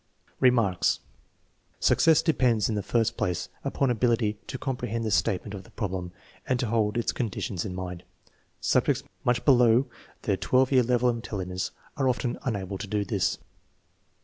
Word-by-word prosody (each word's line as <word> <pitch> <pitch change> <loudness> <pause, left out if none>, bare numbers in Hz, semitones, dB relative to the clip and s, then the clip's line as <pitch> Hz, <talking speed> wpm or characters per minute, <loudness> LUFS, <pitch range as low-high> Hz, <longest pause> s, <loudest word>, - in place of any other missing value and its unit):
Remarks. 115 -8 +3 0.8
Success 160 0 +4
depends, 125 - +2
in - - 0
the 105 - -1
first 115 +2 0
place, 90 0 -1
upon 140 -1 +1
abil 120 0 +2
ity 110 -2 -1
to 130 - -4
comprehend 125 -4 -3
the 110 - -1
statement 100 +2 0
of 100 - -6
the - - -18
problem 95 -4 -4 0.4
and 125 -1 +1
to 125 - 0
hold 110 -1 +1
its 120 - +1
conditions 100 -5 -3
in 90 -3 -5
mind. 90 -1 -5 0.6
Subjects - - +2 0.2
much 120 -1 +1
below 125 -2 +5 0.4
the 100 -5 +1
12 130 +5 +2
year 130 -2 +6
level 125 0 +2
of 120 - 0
intelligence 95 -5 -4 0.3
are 135 -2 +2
often 125 -1 -1
unable 100 -5 -3
to 105 - -5
do 105 0 -1
this. - - 0
115 Hz, 165 wpm, -27 LUFS, 100-125 Hz, 0.8 s, year